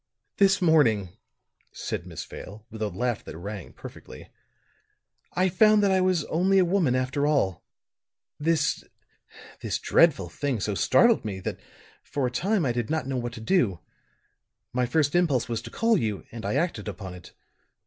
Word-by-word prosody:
"This 195 -2 +4
morning," 120 - +3 0.6
said - - -5
Miss - - -7
Vale, 105 +3 -10
with 110 0 -9
a 110 - +1
laugh 110 +5 -2
that 80 - -9
rang 100 +1 -7
perfectly, - - -12 1.0
"I 185 +1 +2
found 210 +3 +4
that 200 - +3
I 190 0 +3
was 185 -4 +1
only 190 +4 +2
a 185 - +5
woman 170 -8 +2
after 130 +3 0
all. 135 - +1 0.8
This 155 -1 +1 0.8
this - - -2
dreadful 150 - +3
thing 130 - -2
so 105 +1 -1
startled 235 - +4
me 100 -4 -4
that - - -4 0.4
for 140 -2 -3
a 125 - -1
time 195 - 0
I 125 - +1
did 120 -2 -2
not 155 -4 -1
know 135 -1 -2
what 120 -1 -4
to 115 - -8
do. 110 - +1 0.9
My 125 0 +1
first 145 +2 +1
impulse 165 -8 +2
was 115 -1 -3
to - - -9
call 225 -3 +2
you, 105 -5 -3
and 115 -3 -6
I 105 - -1
acted 165 - -1
upon 95 -2 -6
it. 90 -1 -13
130 Hz, 170 wpm, -26 LUFS, 110-175 Hz, 1.0 s, a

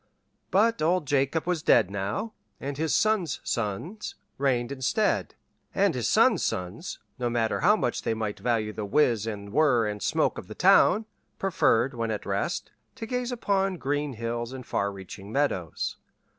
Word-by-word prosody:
But 225 0 +3
old 170 +1 +2
Jacob 140 +3 +1
was 175 -3 0
dead 110 -9 +4
now, 100 - -3 0.3
and 140 +1 -4
his 160 +2 0
son's 215 - +1
sons 115 - -3 0.2
reigned 125 -3 +1
instead; 130 -2 0 0.4
and - - +3
his - - -1
son's - - +4
sons, 90 - -3 0.2
no 120 -1 0
matter 115 -2 0
how 210 +4 +5
much 125 - -1
they 110 - -1
might 110 -2 -3
value 110 -3 0
the 105 - -4
whiz 115 -1 +2
and 100 -2 -6
whir 135 -6 +4
and 105 -1 -3
smoke - - +1
of - - -11
the - - -9
town, 215 +4 +5 0.3
preferred, 135 -9 +2
when 115 -1 -2
at 105 -2 -3
rest, 100 0 -2 0.2
to 225 - -6
gaze 250 +1 -2
upon 195 -5 0
green 145 -1 -1
hills 120 +1 -4
and 130 -2 -8
far 100 0 -1
reaching 100 +1 -10
meadows. 110 - -1
130 Hz, 165 wpm, -27 LUFS, 110-170 Hz, 0.4 s, how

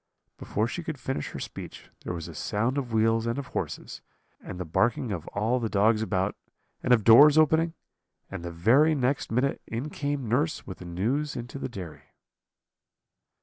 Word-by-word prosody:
"Before 110 +2 -1
she 175 - -5
could 155 -3 -5
finish 130 +3 -3
her - - -7
speech - - -8
there - - -4
was 85 -2 -6
a - - -9
sound 115 +7 -1
of 125 -4 -5
wheels 115 +1 +2
and 115 +2 -1
of 140 -2 -5
horses, - - -5 0.4
and 90 - -8
the 90 - -3
barking 115 +7 +1
of 85 -5 -4
all 110 +5 0
the 115 -2 -2
dogs 110 +2 +3
about, 95 -2 -1 0.5
and - - -1
of 115 -4 +5
doors 140 +8 +8
opening; 160 +2 +3 0.5
and 100 -3 -7
the 85 - -4
very 125 - +4
next 130 -2 0
minute 130 +4 0
in 125 +7 -4
came 145 -3 -3
nurse 145 +8 0
with 95 - -8
the 90 - -9
news 120 +13 -1
into 120 +2 -6
the - - -4
dairy. 90 -9 -9
115 Hz, 185 wpm, -27 LUFS, 105-140 Hz, 0.5 s, doors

